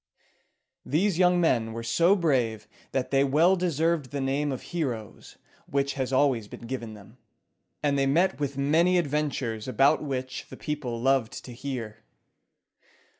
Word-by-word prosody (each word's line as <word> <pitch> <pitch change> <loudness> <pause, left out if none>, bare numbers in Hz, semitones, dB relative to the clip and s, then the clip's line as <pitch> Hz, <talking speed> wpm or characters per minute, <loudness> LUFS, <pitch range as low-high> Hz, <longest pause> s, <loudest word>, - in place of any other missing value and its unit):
These 175 +4 +1
young 180 -1 +4
men 115 -9 +1
were 115 0 -5
so 170 +12 +3
brave 120 - 0 0.2
that 130 -1 -2
they 135 0 +4
well 155 +7 +4
deserved 165 -4 0
the 140 - -4
name 140 +2 0
of 130 - -5
heroes, 125 -11 -5 0.3
which 140 0 0
has 130 -1 -3
always 130 -5 +2
been - - -11
given 115 -3 -5
them; 100 -2 -15 0.7
and 140 -1 +2
they 135 - +2
met 175 +7 +2
with 140 -2 -3
many 165 +6 +3
adventures 140 -8 -1
about 135 +4 +3
which 130 -3 -4
the - - -10
people 140 -6 -4
loved 130 -2 0
to 125 - -9
hear. 120 -4 -5
140 Hz, 150 wpm, -27 LUFS, 125-155 Hz, 0.7 s, young